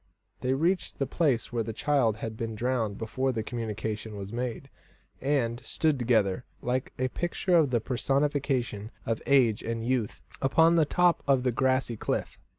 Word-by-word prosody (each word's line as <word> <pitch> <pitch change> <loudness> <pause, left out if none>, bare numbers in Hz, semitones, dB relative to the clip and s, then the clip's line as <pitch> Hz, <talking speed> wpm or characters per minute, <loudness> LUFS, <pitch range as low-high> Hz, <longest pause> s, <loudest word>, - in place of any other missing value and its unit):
They 130 +1 0
reached 175 +6 0
the 135 - 0
place 135 -7 0
where 120 - +1
the 115 0 -4
child 125 -4 +1
had 110 +1 -5
been 115 0 -4
drowned 115 -3 -1
before 130 +4 -1
the 115 -3 -2
communication 110 -2 -4
was 100 +2 -7
made, 125 +2 -3 0.5
and 130 -3 0
stood 150 +4 +1
together, 115 -2 +2 0.2
like 125 +1 -2
a 130 0 0
picture 175 +4 0
of 160 -5 +5
the 120 -2 +2
personification 130 -3 0 0.2
of 115 -1 -1
age 125 -6 +4
and 115 0 -3
youth, 125 -4 -1 0.2
upon 160 +5 +4
the 160 -2 +4
top 175 +3 +3
of 135 -2 +3
the 125 - +2
grassy 130 -1 +1
cliff. - - -3
125 Hz, 165 wpm, -28 LUFS, 115-135 Hz, 0.5 s, of